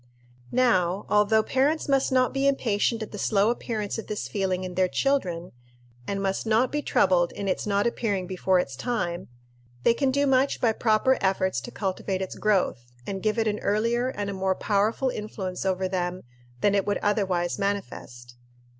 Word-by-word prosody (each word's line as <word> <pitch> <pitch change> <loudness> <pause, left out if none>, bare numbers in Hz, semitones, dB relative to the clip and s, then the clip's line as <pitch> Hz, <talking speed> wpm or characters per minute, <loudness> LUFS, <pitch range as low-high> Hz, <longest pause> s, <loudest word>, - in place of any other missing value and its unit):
_ - - -32 0.5
Now, 200 -7 +2
although 210 +1 +4
parents 285 +7 +1
must 275 -1 +2
not 255 -1 +2
be 275 0 +1
impatient 230 -4 +1
at 215 - -9
the 205 - -7
slow 205 +2 +2
appearance 220 -3 -3
of - - -8
this 210 - -4
feeling 185 -2 -1
in 185 -1 -5
their 185 +1 +2
children, 180 -9 -1 0.6
and 200 0 -2
must 195 +3 -1
not 225 +3 +3
be 295 - -1
troubled 180 -11 +2
in 200 - -5
its 190 - -1
not 200 0 +1
appearing 205 -5 -1
before 185 0 +1
its 140 -7 -1
time, 175 - -3 0.6
they 230 - +5
can 270 +3 +1
do 280 +2 +2
much 270 0 +2
by 230 - +3
proper 220 +4 +2
efforts 190 -1 +1
to - - -8
cultivate 190 -3 -3
its 190 - -6
growth, 185 - 0 0.2
and 195 -1 -4
give 215 +1 0
it 225 -1 +1
an 210 0 -1
earlier 230 +4 +1
and 205 -6 -4
a - - -5
more 190 0 0
powerful 215 +7 +1
influence 195 -4 -4
over 190 0 0
them 180 -1 -3 0.4
than 205 - +3
it 200 -1 +1
would 205 - +1
otherwise 190 -4 0
manifest. 185 -12 -4
205 Hz, 185 wpm, -26 LUFS, 185-235 Hz, 0.6 s, they